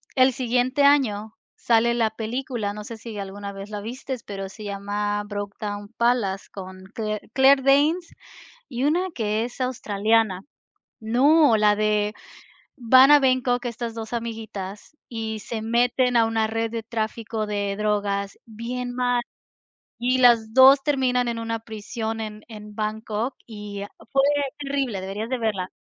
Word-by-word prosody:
el 260 Hz, 0 st, +5 dB
siguiente 250 Hz, +3 st, +1 dB
año 220 Hz, -7 st, +3 dB, 0.2 s
sale 235 Hz, 0 st, +2 dB
la 230 Hz, -2 st, +2 dB
película, 225 Hz, -1 st, -3 dB
no 210 Hz, 0 st, -7 dB
sé 225 Hz, +2 st, -8 dB
si 220 Hz, -1 st, -8 dB
alguna 200 Hz, 0 st, -6 dB
vez 195 Hz, +1 st, -8 dB
la 210 Hz, -1 st, -5 dB
viste 250 Hz, +3 st, -6 dB
pero 195 Hz, -1 st, -6 dB
se 215 Hz, +2 st, -10 dB
llama 205 Hz, +1 st, -2 dB
Brokedown 205 Hz, 0 st, -5 dB
Palace 235 Hz, -5 st, +1 dB
con 185 Hz, -1 st, -9 dB
Claire 215 Hz, -1 st, -4 dB
Claire 270 Hz, +1 st, +6 dB
Danes 295 Hz, +6 st, +3 dB, 0.6 s
y 250 Hz, 0 st, -3 dB
una 345 Hz, +6 st, +2 dB
que 220 Hz, 0 st, 0 dB
es 245 Hz, +2 st, -8 dB
australiana. 220 Hz, -5 st, +1 dB, 0.6 s
No, 260 Hz, +4 st, +4 dB
la 210 Hz, -1 st, +4 dB
de 210 Hz, 0 st, +1 dB, 0.6 s
van 260 Hz, +2 st, +6 dB
a 295 Hz, 0 st, +8 dB
Bangkok 255 Hz, -2 st, +1 dB
estas 235 Hz, -1 st, -4 dB
2 225 Hz, 0 st, -6 dB
amiguitas 220 Hz, 0 st, -6 dB
y 220 Hz, -2 st, -4 dB
se 225 Hz, +1 st, -5 dB
meten 245 Hz, +2 st, +2 dB
a 230 Hz, -, +5 dB
una 225 Hz, -1 st, +1 dB
red 225 Hz, +1 st, -2 dB
de 230 Hz, 0 st, -4 dB
tráfico 220 Hz, -1 st, -3 dB
de 205 Hz, -1 st, -2 dB
drogas 205 Hz, -1 st, -1 dB
bien 245 Hz, +2 st, -5 dB
mal, 245 Hz, -1 st, +1 dB, 0.8 s
y 250 Hz, +2 st, +1 dB
las 235 Hz, -3 st, +5 dB
2 265 Hz, +2 st, +8 dB
terminan 255 Hz, -3 st, +1 dB
en 235 Hz, -1 st, -2 dB
una 230 Hz, 0 st, -3 dB
prisión 225 Hz, 0 st, -5 dB
en 215 Hz, -1 st, -6 dB
en 210 Hz, -2 st, -10 dB
Bangkok 215 Hz, +3 st, -3 dB
y 210 Hz, -3 st, -7 dB
ah -, -, -9 dB, 0.2 s
fue 270 Hz, -1 st, +4 dB, 0.4 s
terrible, 275 Hz, -7 st, -2 dB
deberías 200 Hz, +5 st, -5 dB
de 260 Hz, -, 0 dB
verla. 205 Hz, -5 st, -2 dB
225 Hz, 150 wpm, -24 LUFS, 210-250 Hz, 0.8 s, a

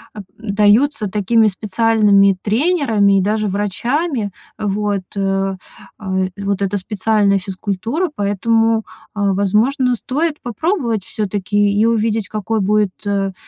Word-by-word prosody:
а, 210 Hz, -, -6 dB, 0.2 s
даются 215 Hz, +4 st, +2 dB
такими 215 Hz, +3 st, +2 dB
специальными 205 Hz, -1 st, +3 dB
тренерами 220 Hz, -, +2 dB
и -, -, +1 dB
даже 215 Hz, +2 st, 0 dB
врачами. 215 Hz, -, -1 dB, 0.3 s
А 210 Hz, -, -3 dB
вот, 205 Hz, -1 st, -1 dB
э. 195 Hz, -1 st, -1 dB, 0.4 s
А 190 Hz, -3 st, -6 dB, 0.3 s
вот 200 Hz, 0 st, -2 dB
эта 200 Hz, +1 st, -1 dB
специальная 200 Hz, 0 st, +1 dB
физкультура. 200 Hz, -, -3 dB
Поэтому, 225 Hz, +3 st, +1 dB, 0.3 s
а, 200 Hz, -2 st, 0 dB
возможно, 230 Hz, +7 st, +1 dB
стоит 300 Hz, +6 st, -2 dB
попробовать 240 Hz, -, -1 dB
всё-таки 205 Hz, 0 st, 0 dB
и 220 Hz, -, +4 dB
увидеть, 225 Hz, -2 st, 0 dB
какой 215 Hz, 0 st, -2 dB
будет, 210 Hz, 0 st, +2 dB
э, 195 Hz, -1 st, -1 dB
210 Hz, 120 wpm, -18 LUFS, 200-230 Hz, 0.4 s, и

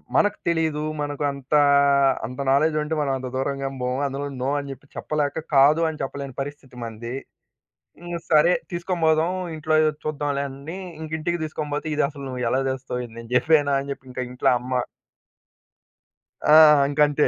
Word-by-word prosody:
మనకు 205 Hz, 0 st, +3 dB
తెలిదు. 160 Hz, -3 st, +1 dB, 0.2 s
మనకంతా 145 Hz, 0 st, 0 dB, 0.6 s
అంత 125 Hz, +3 st, -8 dB
నాలెడ్జ్ 155 Hz, +3 st, +3 dB
ఉంటే 155 Hz, +1 st, -2 dB
మనం 140 Hz, -2 st, 0 dB
అంత 130 Hz, 0 st, -6 dB
దూరంగేమి 135 Hz, 0 st, -2 dB
బోము. 125 Hz, +2 st, -1 dB
అందులోను 140 Hz, 0 st, -5 dB
నో 135 Hz, -, 0 dB
అని 140 Hz, -1 st, -7 dB
జెప్పి 135 Hz, +2 st, -11 dB
చెప్పలేక 150 Hz, 0 st, -2 dB
కాదు 145 Hz, +4 st, +6 dB
అని 155 Hz, -, -7 dB
చెప్పలేని 135 Hz, -1 st, -6 dB
పరిస్థితి 140 Hz, -2 st, -8 dB
మనది. 115 Hz, +2 st, -6 dB, 0.9 s
ఇంగ 175 Hz, 0 st, -5 dB
సరే, 155 Hz, +2 st, +5 dB, 0.2 s
తీసుకొని 175 Hz, 0 st, -3 dB
బోదాం 160 Hz, +2 st, +3 dB, 0.2 s
ఇంట్లో 155 Hz, 0 st, 0 dB, 0.3 s
చూద్దాంలే 145 Hz, -2 st, -1 dB
అన్నీ 140 Hz, +6 st, -8 dB, 0.2 s
ఇంకా 160 Hz, 0 st, -7 dB
ఇంటికి 175 Hz, +2 st, -1 dB
తీసుకొని 155 Hz, -1 st, -5 dB
పోతే, 150 Hz, -, -3 dB
"ఇది 150 Hz, -, +1 dB
అసలు 140 Hz, -2 st, -9 dB
నువ్వు 125 Hz, -1 st, -4 dB
ఎలా 130 Hz, +2 st, +2 dB
తేస్తావు? 130 Hz, -1 st, -3 dB
ఇది 115 Hz, -, -16 dB
నేను 115 Hz, 0 st, -10 dB
జెప్పానా" 145 Hz, +1 st, +4 dB
అని 140 Hz, +1 st, -6 dB
జెప్పి 130 Hz, -, -11 dB
ఇంక 125 Hz, -, -5 dB
ఇంట్లో 125 Hz, -, +2 dB
అమ్మ. 125 Hz, +1 st, -5 dB, 1.8 s
ఆ! -, -, +10 dB, 0.3 s
ఇంకంతే 145 Hz, 0 st, +3 dB
145 Hz, 160 wpm, -23 LUFS, 135-155 Hz, 1.8 s, ఆ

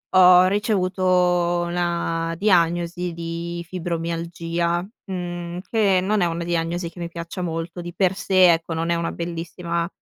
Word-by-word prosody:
ho 180 Hz, 0 st, +8 dB
ricevuto 185 Hz, -3 st, +1 dB
una 170 Hz, -1 st, -1 dB
diagnosi 175 Hz, -2 st, +1 dB
di 170 Hz, +1 st, -5 dB
fibromialgia, 170 Hz, 0 st, -2 dB, 0.3 s
mhmm, 175 Hz, -1 st, -4 dB
che 205 Hz, -5 st, +3 dB
non 205 Hz, +2 st, +1 dB
è -, -, +4 dB
una 170 Hz, 0 st, -2 dB
diagnosi 170 Hz, 0 st, -1 dB
che 175 Hz, -, -14 dB
mi 170 Hz, -1 st, -4 dB
piaccia 170 Hz, +2 st, -6 dB
molto, 165 Hz, +1 st, -4 dB
di 175 Hz, 0 st, -7 dB
per 190 Hz, 0 st, +1 dB
sé, 185 Hz, -4 st, +5 dB
ecco 165 Hz, 0 st, -3 dB
non 165 Hz, +1 st, -2 dB
è 170 Hz, -, +2 dB
una 170 Hz, 0 st, -2 dB
bellissima, 170 Hz, 0 st, -3 dB
175 Hz, 145 wpm, -23 LUFS, 170-180 Hz, 0.3 s, ho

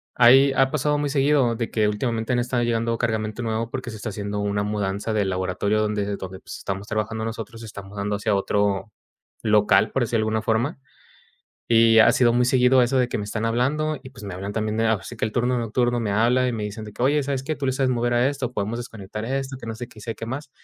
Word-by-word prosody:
ahí, 135 Hz, +3 st, +6 dB
ha 135 Hz, 0 st, +3 dB
pasado 150 Hz, 0 st, +1 dB
muy 145 Hz, 0 st, -1 dB
seguido, 140 Hz, -3 st, +2 dB
de 115 Hz, 0 st, -3 dB
que 110 Hz, -2 st, +2 dB
últimamente, 115 Hz, +2 st, -2 dB
han 120 Hz, -, +2 dB
estado 120 Hz, 0 st, 0 dB
llegando 115 Hz, 0 st, 0 dB
cargamento 110 Hz, -1 st, -2 dB
nuevo, 115 Hz, 0 st, -2 dB
porque 130 Hz, -1 st, -5 dB
se 110 Hz, -, -7 dB
está 110 Hz, -, -5 dB
haciendo 105 Hz, 0 st, -4 dB
una 100 Hz, 0 st, 0 dB
mudanza 100 Hz, 0 st, -2 dB
del 100 Hz, -3 st, +1 dB
laboratorio 95 Hz, +3 st, 0 dB
donde 105 Hz, -1 st, 0 dB
donde, 95 Hz, -1 st, -8 dB
pues, -, -, -9 dB
estamos 100 Hz, +2 st, -5 dB
trabajando 110 Hz, 0 st, -2 dB
nosotros, 115 Hz, 0 st, -6 dB
se -, -, -8 dB
está 100 Hz, -1 st, -8 dB
mudando 100 Hz, +1 st, -4 dB
hacia 105 Hz, +1 st, 0 dB
otro 100 Hz, +1 st, 0 dB, 0.5 s
local, 105 Hz, -1 st, +4 dB
por 135 Hz, -, +1 dB
decirlo 115 Hz, 0 st, 0 dB
de -, -, 0 dB
alguna 110 Hz, 0 st, 0 dB
forma, 120 Hz, +7 st, 0 dB, 0.9 s
y 115 Hz, -1 st, +6 dB
ha -, -, +7 dB
sido 120 Hz, -2 st, +4 dB
muy 125 Hz, +1 st, +3 dB
seguido 125 Hz, 0 st, +4 dB
eso 125 Hz, +2 st, +2 dB
de 125 Hz, -1 st, +2 dB
que -, -, -2 dB
me 105 Hz, -, -3 dB
están 110 Hz, +2 st, -3 dB
hablando. 145 Hz, +6 st, 0 dB
Y, 130 Hz, -, -11 dB
pues, 125 Hz, -5 st, -12 dB
me 95 Hz, -2 st, -6 dB
hablan, 100 Hz, +2 st, -5 dB
también 110 Hz, 0 st, -1 dB
así 110 Hz, 0 st, -1 dB
que -, -, -1 dB
el 110 Hz, -, -1 dB
turno 125 Hz, +2 st, +1 dB
nocturno 120 Hz, +1 st, 0 dB
me 110 Hz, -3 st, -1 dB
habla, 120 Hz, +4 st, +3 dB
y -, -, -1 dB
me 110 Hz, -2 st, -3 dB
dicen 105 Hz, +1 st, -6 dB
de 105 Hz, -, -9 dB
que: 120 Hz, -, -5 dB
"Oye, 145 Hz, +3 st, +3 dB
¿sabes 135 Hz, -1 st, -2 dB
qué?, 155 Hz, +3 st, -2 dB
tú 145 Hz, -, -5 dB
le 130 Hz, -, +1 dB
sabes 135 Hz, 0 st, +1 dB
mover 120 Hz, -1 st, 0 dB
a 120 Hz, +2 st, +3 dB
esto, 135 Hz, -3 st, -3 dB
podemos 110 Hz, +1 st, -2 dB
desconectar 110 Hz, -3 st, -7 dB
esto, 135 Hz, +2 st, -3 dB
que 130 Hz, -, -10 dB
no 115 Hz, -, -4 dB
sé 120 Hz, +2 st, -6 dB
qué, 110 Hz, -, -15 dB
sé 115 Hz, +1 st, -5 dB
qué 115 Hz, -, -6 dB
más", 135 Hz, +4 st, -5 dB
115 Hz, 245 wpm, -23 LUFS, 105-125 Hz, 0.9 s, ha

